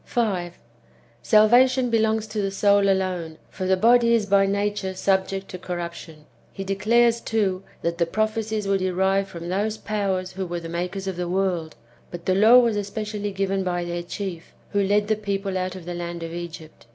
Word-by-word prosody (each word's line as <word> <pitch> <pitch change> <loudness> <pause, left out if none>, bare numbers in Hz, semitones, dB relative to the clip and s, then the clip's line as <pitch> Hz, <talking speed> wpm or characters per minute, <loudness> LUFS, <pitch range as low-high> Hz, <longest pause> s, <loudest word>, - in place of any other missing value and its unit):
5. 185 -7 -2 0.6
Salvation 245 +4 +4
belongs 220 -1 +2
to 215 -1 -3
the 195 - 0
soul 200 0 +3
alone, 180 -4 -1
for 185 -1 -4
the 190 0 +3
body 235 +3 +5
is 220 -3 +1
by 200 0 +3
nature 200 -1 -1
subject 190 0 0
to 185 - -7
corruption. 170 -3 -7 0.3
He 195 - -6
declares, 230 +4 +2
too, 200 -4 0 0.2
that 170 +1 -2
the 170 - +2
prophecies 215 +1 -1
were 195 0 +2
derived 190 +1 +1
from 170 -3 -8
those 210 +4 -1
powers 195 -4 -2
who 190 0 -4
were 175 0 -3
the 165 -1 -8
makers 180 +3 -4
of 190 -2 -4
the 175 -1 -3
world, 180 -4 -1 0.3
but 170 -1 -9
the 185 - +2
law 220 +6 +7
was 230 -4 +3
specially 210 -1 -4
given 195 0 -1
by 175 -1 -2
their 175 0 -3
chief, 175 -1 -6 0.2
who 205 - +1
led 205 +1 +2
the 215 - +2
people 200 -2 -3
out 185 0 -2
of 185 -3 -9
the 175 - -5
land 170 -1 -5
of 165 0 -6
Egypt. 165 -6 -9
195 Hz, 190 wpm, -24 LUFS, 180-210 Hz, 0.6 s, law